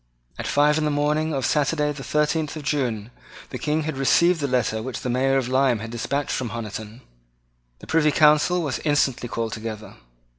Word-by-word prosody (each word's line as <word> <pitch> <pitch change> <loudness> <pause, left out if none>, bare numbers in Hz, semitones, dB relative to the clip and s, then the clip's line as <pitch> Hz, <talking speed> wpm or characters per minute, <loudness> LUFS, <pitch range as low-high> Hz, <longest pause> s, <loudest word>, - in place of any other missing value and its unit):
At - - -3
five 150 +2 +3
in - - -1
the 150 - +1
morning 150 +2 0
of 135 -4 -1
Saturday 150 +2 +1
the 140 -2 -7
thirteenth 150 +1 0
of 155 - -7
June, 125 -6 -2 0.4
the - - -5
King 155 +1 0
had 155 -2 -4
received 170 +6 +3
the 140 - 0
letter 115 -4 0
which 125 +1 -5
the 125 - -2
Mayor 135 +2 +2
of 130 -3 -1
Lyme 130 -1 +2
had 115 +1 -7
despatched 140 +4 -2
from 125 -3 -2
Honiton. 110 +1 -7 0.8
The - - -10
Privy 155 -2 +2
Council 155 +4 +4
was 145 -5 -2
instantly 140 -5 0
called 115 -1 -3
together. 110 -1 -7
140 Hz, 190 wpm, -23 LUFS, 120-150 Hz, 0.8 s, Council